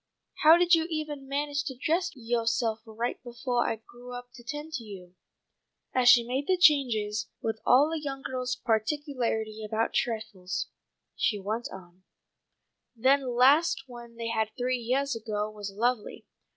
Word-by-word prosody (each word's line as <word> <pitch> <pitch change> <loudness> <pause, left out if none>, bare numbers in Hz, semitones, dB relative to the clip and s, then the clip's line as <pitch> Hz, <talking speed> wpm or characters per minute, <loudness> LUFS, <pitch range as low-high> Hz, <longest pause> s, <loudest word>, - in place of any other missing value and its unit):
How 320 +2 +8
did 355 0 +3
you 325 -1 +4
evah 310 -2 -3
manage 285 +1 -2
to 265 -3 -5
dress 335 +7 +1
yoahself 230 -1 0
right 230 +2 -3
befoah 240 0 -1
I - - 0
grew 240 +3 -12
up 245 0 -8
to 245 - -13
tend 295 +5 -6
to 255 - -3
you?" 185 -4 -11 0.8
As 250 -1 +5
she 240 -1 +8
made 260 +4 -2
the 370 - +3
changes 230 -10 +3
with 225 -1 -3
all 280 +5 +6
a 325 - -1
young 275 -2 -5
girl's 255 -1 -2
particularity 225 -2 -1
about 220 +1 -1
trifles, 215 -5 -2 0.5
she 215 - +1
went 215 +4 -3
on, 180 -1 -12 0.9
"That 265 +4 +4
last 270 +6 +4
one 240 -2 -11
they 230 0 -4
had 220 -1 0
three 250 0 0
yeahs 260 +3 0
ago 215 -1 -3
was 205 -2 -7
lovely. 230 +2 -1
245 Hz, 155 wpm, -28 LUFS, 220-280 Hz, 0.9 s, How